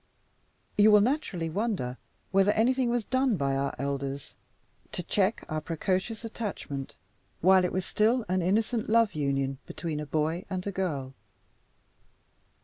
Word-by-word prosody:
You 210 Hz, +1 st, +8 dB
will 210 Hz, -1 st, +7 dB
naturally 220 Hz, -, 0 dB
wonder 190 Hz, -, -1 dB, 0.3 s
whether 195 Hz, +1 st, +4 dB
anything 250 Hz, +2 st, +2 dB
was 240 Hz, -2 st, 0 dB
done 260 Hz, -4 st, +2 dB
by 140 Hz, -2 st, 0 dB
our 140 Hz, +1 st, -1 dB
elders 140 Hz, 0 st, -3 dB, 0.6 s
to 180 Hz, -, -2 dB
check 200 Hz, +5 st, +1 dB
our 155 Hz, 0 st, -2 dB
precocious 185 Hz, +8 st, -2 dB
attachment, 195 Hz, -, -5 dB, 0.5 s
while 185 Hz, +1 st, +6 dB
it 180 Hz, -, 0 dB
was 185 Hz, -1 st, -1 dB
still 225 Hz, +2 st, +2 dB
an 185 Hz, +1 st, +1 dB
innocent 215 Hz, +5 st, +1 dB
love 230 Hz, -1 st, +4 dB
union 135 Hz, -2 st, -1 dB
between 160 Hz, -3 st, -4 dB
a 150 Hz, -, -5 dB
boy 160 Hz, +5 st, -1 dB
and 185 Hz, -2 st, -3 dB
a 200 Hz, -, -2 dB
girl. 150 Hz, -9 st, -3 dB
185 Hz, 140 wpm, -28 LUFS, 150-220 Hz, 0.6 s, You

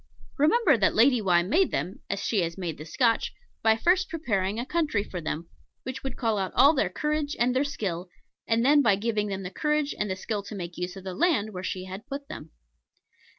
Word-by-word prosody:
Remember 305 Hz, -, +4 dB
that 200 Hz, -, +2 dB
Lady 245 Hz, +1 st, +5 dB
Why 175 Hz, -3 st, +3 dB
made 325 Hz, -, +2 dB
them, 170 Hz, +8 st, -3 dB
as 200 Hz, -, -2 dB
she 210 Hz, -5 st, +1 dB
has 170 Hz, 0 st, -3 dB
made 170 Hz, -6 st, -4 dB
the 155 Hz, -, -7 dB
Scotch, 230 Hz, -, +1 dB, 0.3 s
by 220 Hz, 0 st, +4 dB
first 365 Hz, +8 st, +2 dB
preparing 210 Hz, -, -1 dB
a 240 Hz, -, -3 dB
country 300 Hz, -9 st, 0 dB
for 180 Hz, -4 st, -6 dB
them, 160 Hz, +1 st, -4 dB, 0.4 s
which 260 Hz, +1 st, -5 dB
would 270 Hz, -2 st, -5 dB
call 225 Hz, -4 st, 0 dB
out 190 Hz, -1 st, -2 dB
all 280 Hz, +5 st, +7 dB
their 260 Hz, -, +1 dB
courage 300 Hz, +6 st, -2 dB
and 245 Hz, +1 st, +2 dB
their 265 Hz, -, +3 dB
skill; 185 Hz, -, -4 dB, 0.4 s
and 230 Hz, +1 st, +2 dB
then 290 Hz, +2 st, +6 dB
by 220 Hz, -7 st, +4 dB
giving 210 Hz, 0 st, -1 dB
them 195 Hz, -1 st, -4 dB
the 180 Hz, -, -6 dB
courage 300 Hz, +5 st, 0 dB
and 210 Hz, -, -2 dB
the 190 Hz, -, -1 dB
skill 205 Hz, +2 st, -3 dB
to 205 Hz, +2 st, -9 dB
make 175 Hz, -2 st, -6 dB
use 180 Hz, +1 st, -4 dB
of 190 Hz, -, -9 dB
the 190 Hz, -1 st, -5 dB
land 275 Hz, -, +1 dB
where 180 Hz, -, -5 dB
she 185 Hz, 0 st, -4 dB
had 190 Hz, +6 st, -8 dB
put 280 Hz, 0 st, -6 dB
them. 155 Hz, -, -8 dB
220 Hz, 225 wpm, -27 LUFS, 185-280 Hz, 0.4 s, all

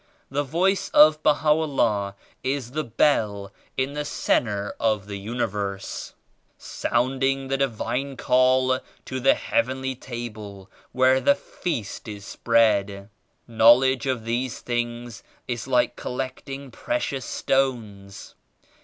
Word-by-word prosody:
The 140 Hz, +2 st, 0 dB
Voice 180 Hz, +8 st, 0 dB
of 155 Hz, 0 st, +7 dB
Baha'u'llah 145 Hz, -10 st, +2 dB, 0.3 s
is 130 Hz, -1 st, -3 dB
a 155 Hz, -, 0 dB
Bell 105 Hz, -6 st, +1 dB, 0.2 s
in 135 Hz, +1 st, 0 dB
the 150 Hz, 0 st, -2 dB
centre 105 Hz, -7 st, 0 dB
of 110 Hz, -3 st, +1 dB
the 100 Hz, -1 st, -6 dB
Universe, 100 Hz, -3 st, -4 dB, 0.4 s
sounding 135 Hz, +2 st, -1 dB
the 135 Hz, -, +1 dB
Di 135 Hz, 0 st, +2 dB
vine 130 Hz, +3 st, -3 dB
Call 130 Hz, 0 st, +3 dB, 0.3 s
to 130 Hz, -, -4 dB
the 135 Hz, +2 st, +4 dB
Heavenly 130 Hz, +1 st, -1 dB
Table 110 Hz, -5 st, -8 dB, 0.2 s
where 130 Hz, +1 st, +3 dB
the 285 Hz, -, +4 dB
Feast 140 Hz, -, -5 dB
100 105 Hz, -1 st, -6 dB
is 100 Hz, -, -13 dB
spread. 105 Hz, -3 st, +1 dB, 0.4 s
Knowledge 125 Hz, +4 st, +5 dB
of 125 Hz, -4 st, -1 dB
these 120 Hz, +2 st, -2 dB
things 120 Hz, -1 st, -3 dB, 0.3 s
is 120 Hz, 0 st, -4 dB
like 125 Hz, -2 st, +2 dB
col 125 Hz, -, -6 dB
lecting 135 Hz, +1 st, -5 dB
precious 140 Hz, -, -2 dB
stones. 110 Hz, -8 st, -2 dB
125 Hz, 120 wpm, -24 LUFS, 110-135 Hz, 0.4 s, of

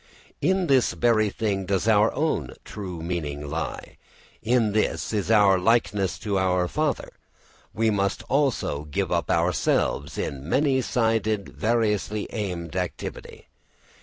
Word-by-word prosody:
In 190 Hz, 0 st, +2 dB
this 135 Hz, -5 st, +3 dB
very 110 Hz, -3 st, +2 dB
thing 100 Hz, -3 st, -2 dB
does 100 Hz, +2 st, 0 dB
our 110 Hz, 0 st, +4 dB
own 140 Hz, -, -1 dB
true 90 Hz, -6 st, -7 dB
meaning 75 Hz, -4 st, -4 dB
lie, 80 Hz, +3 st, -5 dB, 0.4 s
in 115 Hz, -1 st, +2 dB
this 110 Hz, +1 st, -1 dB
is 105 Hz, -1 st, -1 dB
our 100 Hz, -4 st, +5 dB
likeness 100 Hz, -2 st, +1 dB
to 100 Hz, -3 st, 0 dB
our 90 Hz, -1 st, +1 dB
father. 155 Hz, -, -1 dB, 0.6 s
We 110 Hz, 0 st, +1 dB
must 100 Hz, -1 st, -1 dB
also 135 Hz, -, 0 dB
give 75 Hz, -, -2 dB
up -, -, 0 dB
ourselves 85 Hz, -1 st, +1 dB
in 70 Hz, +2 st, -4 dB
many 135 Hz, +1 st, +2 dB
sided 110 Hz, -4 st, 0 dB
variously 110 Hz, -2 st, 0 dB
aimed 90 Hz, -6 st, -4 dB
activity. 90 Hz, -1 st, -5 dB
105 Hz, 130 wpm, -25 LUFS, 90-115 Hz, 0.6 s, our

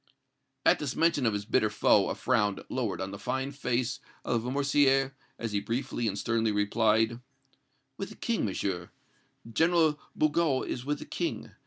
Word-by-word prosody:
At -, -, +5 dB
this -, -, -3 dB
mention 165 Hz, -6 st, +3 dB
of 110 Hz, -, +2 dB
his 105 Hz, 0 st, -3 dB
bitter 110 Hz, -1 st, +2 dB
foe, 105 Hz, -1 st, +3 dB
a -, -, -2 dB
frown 105 Hz, -6 st, +1 dB
lowered 120 Hz, -6 st, -2 dB
on 95 Hz, 0 st, -3 dB
the 100 Hz, -, -7 dB
fine 130 Hz, +6 st, -2 dB
face 125 Hz, -3 st, -1 dB, 0.3 s
of 120 Hz, -2 st, +1 dB
Lamoricière, 135 Hz, +1 st, +2 dB, 0.3 s
as 115 Hz, -2 st, -4 dB
he 100 Hz, -, +1 dB
briefly 120 Hz, +3 st, -2 dB
and 100 Hz, -1 st, -2 dB
sternly 115 Hz, +1 st, +1 dB
replied: 110 Hz, +2 st, +2 dB, 0.8 s
"With -, -, -4 dB
the -, -, -11 dB
King, -, -, -1 dB
Monsieur 90 Hz, -3 st, -2 dB, 0.6 s
General 160 Hz, +4 st, +3 dB, 0.2 s
Bugeaud 155 Hz, -3 st, +2 dB
is 125 Hz, -, -4 dB
with 145 Hz, +1 st, 0 dB
the -, -, -9 dB
King. -, -, -3 dB
120 Hz, 165 wpm, -29 LUFS, 105-135 Hz, 0.8 s, At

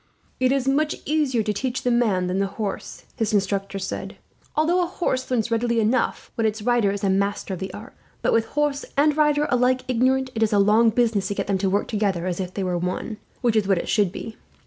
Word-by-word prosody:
"It 255 Hz, 0 st, +3 dB
is 270 Hz, -1 st, 0 dB
much 300 Hz, +3 st, +2 dB
easier 285 Hz, -7 st, +1 dB
to 210 Hz, -, -1 dB
teach 255 Hz, +4 st, -3 dB
the 250 Hz, -, +1 dB
man 215 Hz, -7 st, +2 dB
than 180 Hz, +2 st, -1 dB
the 195 Hz, -, +1 dB
horse," 210 Hz, -3 st, -5 dB
his 220 Hz, -2 st, 0 dB
instructor 195 Hz, 0 st, -1 dB
said, 190 Hz, 0 st, -5 dB, 0.4 s
"although 335 Hz, +4 st, +2 dB
a 350 Hz, -, 0 dB
horse 260 Hz, -8 st, -2 dB
learns 235 Hz, -2 st, 0 dB
readily 235 Hz, 0 st, +1 dB
enough, 225 Hz, +3 st, 0 dB
when 225 Hz, -1 st, +1 dB
its 215 Hz, 0 st, -3 dB
rider 240 Hz, -3 st, +3 dB
is 200 Hz, 0 st, -3 dB
a 195 Hz, -, +2 dB
master 200 Hz, 0 st, -1 dB
of 180 Hz, -, -5 dB
the 190 Hz, -1 st, -5 dB
art; 220 Hz, +7 st, -10 dB, 0.3 s
but -, -, +2 dB
with 225 Hz, -1 st, +3 dB
horse 295 Hz, -1 st, +1 dB
and 295 Hz, +1 st, +4 dB
rider 295 Hz, -1 st, +3 dB
alike 250 Hz, +1 st, +3 dB
ignorant, 260 Hz, +1 st, +1 dB
it 225 Hz, -, -3 dB
is 220 Hz, -1 st, +2 dB
a -, -, +4 dB
long 215 Hz, +3 st, +5 dB
business 220 Hz, -3 st, +1 dB
to 200 Hz, -, -3 dB
get -, -, -2 dB
them 195 Hz, -2 st, 0 dB
to 195 Hz, 0 st, +1 dB
work 200 Hz, +2 st, 0 dB
together 200 Hz, -6 st, -1 dB
as 180 Hz, -1 st, -2 dB
if 185 Hz, -1 st, -4 dB
they 195 Hz, -, -2 dB
were 180 Hz, -1 st, -1 dB
one, 180 Hz, +5 st, -3 dB, 0.2 s
which 240 Hz, -3 st, +2 dB
is 210 Hz, -3 st, +2 dB
what 190 Hz, -3 st, +1 dB
should 205 Hz, -5 st, +2 dB
be. 220 Hz, +3 st, -7 dB
225 Hz, 235 wpm, -23 LUFS, 200-255 Hz, 0.4 s, long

